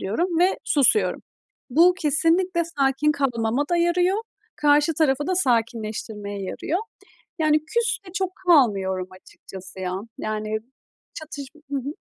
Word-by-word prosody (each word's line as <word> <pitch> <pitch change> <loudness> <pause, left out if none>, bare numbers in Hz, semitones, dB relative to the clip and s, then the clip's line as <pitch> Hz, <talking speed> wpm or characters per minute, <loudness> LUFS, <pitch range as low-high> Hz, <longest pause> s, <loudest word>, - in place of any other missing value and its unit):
diyorum 335 - -1
ve 365 +2 +3
susuyorum. 300 - +2 0.5
Bu 340 +7 +5
kesinlikle 340 +3 +2 0.2
sakin 275 +2 +2
kalmama 250 -2 0
da 345 - +3
yarıyor, 355 +3 +2 0.4
karşı 295 +2 +3
tarafı 290 -2 +1
da 370 - +1
sakinleştirmeye 220 - -2
yarıyor. 300 - -2 0.6
Yani, 310 -1 +3
küs 460 +6 0
de 360 - -11
çok 380 -1 -1 0.2
kalmıyorum 195 - +3
açıkçası 185 0 -12
ya. 180 -1 -2 0.3
Yani 215 0 -2 0.6
çatışm 310 -2 -9
Hı - - 0
hı. 275 +2 -3
290 Hz, 125 wpm, -23 LUFS, 220-340 Hz, 0.6 s, Bu